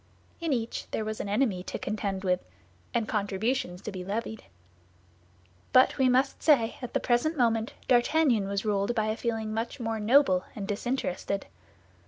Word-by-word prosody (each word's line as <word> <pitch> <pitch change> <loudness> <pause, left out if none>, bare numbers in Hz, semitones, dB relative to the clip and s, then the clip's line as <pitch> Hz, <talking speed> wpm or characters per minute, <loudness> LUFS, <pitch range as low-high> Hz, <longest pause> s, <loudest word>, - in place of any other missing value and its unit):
In 335 -3 -2
each 235 -3 -2
there 220 - -2
was 215 0 -4
an 200 - -3
enemy 205 -4 +1
to - - -4
contend 200 -2 -3
with, 180 -1 +2 0.5
and 230 -3 0
contributions 200 -2 -1
to 215 - -4
be 185 -2 -6
levied. 220 +3 -4 1.3
But, 255 +1 +5
we 260 -1 +5
must 260 +2 +2
say, 250 -8 +3
at 245 - -7
the - - +4
present 255 +7 +1
moment 230 +1 +1
D'Artagnan 245 -3 +3
was 200 +2 -2
ruled 205 +2 0
by 215 -1 +1
a 215 - 0
feeling 225 -2 -2
much 225 +4 -3
more 225 -2 -2
noble 215 -4 +4
and 200 -2 -5
disinterested. 205 -3 -2
225 Hz, 165 wpm, -28 LUFS, 200-250 Hz, 1.3 s, But